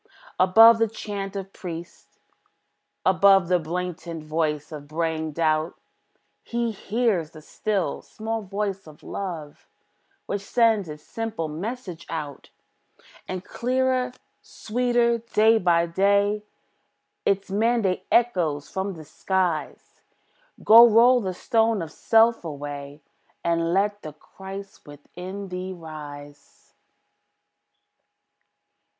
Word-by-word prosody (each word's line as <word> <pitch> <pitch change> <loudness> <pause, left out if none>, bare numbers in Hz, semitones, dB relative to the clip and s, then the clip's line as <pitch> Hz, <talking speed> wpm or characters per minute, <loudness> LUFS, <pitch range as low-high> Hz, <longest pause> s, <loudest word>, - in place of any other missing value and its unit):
Above 225 +5 +7
the 225 - +3
chant 205 -2 -6
of 195 0 -6
priests, 170 -1 -9 0.9
above 190 -1 +5
The 180 -1 +3
blatant 170 0 -5
voice 155 -1 -2
of 145 -2 -8
braying 160 0 -2
doubt, 155 0 0 0.6
He 235 -1 -2
hears 210 -5 -1
the 155 -1 -13
still, 200 +2 -2
small 225 +1 -5
voice 195 -2 -4
of 155 -1 -15
Love, 165 -7 -6 0.6
Which 200 - -3
sends 220 -4 +2
its 150 0 -9
simple 225 -8 -4
message 180 +2 -6
out. 150 -3 -6 0.8
And 185 0 -5
clearer, 255 0 0 0.3
sweeter, 240 0 0
day 225 0 +3
by 170 -2 +3
day, 200 +4 +2 0.8
Its 195 -1 0
mandate 205 -3 +1
echoes 175 -12 +1
from 190 +1 -3
the 160 -2 -11
skies, 180 -1 -2 0.6
"Go 230 +2 +9
roll 240 +3 +6
the 185 -3 -3
stone 225 +2 +1
of 160 - -8
self 225 +5 +3
away, 145 -1 -7 0.4
And 165 0 +1
let 205 +2 +1
the 155 - -8
Christ 195 +5 -11
within 180 +7 -9
thee 185 +1 -5
rise." 145 -4 -11
190 Hz, 110 wpm, -24 LUFS, 160-220 Hz, 0.9 s, Go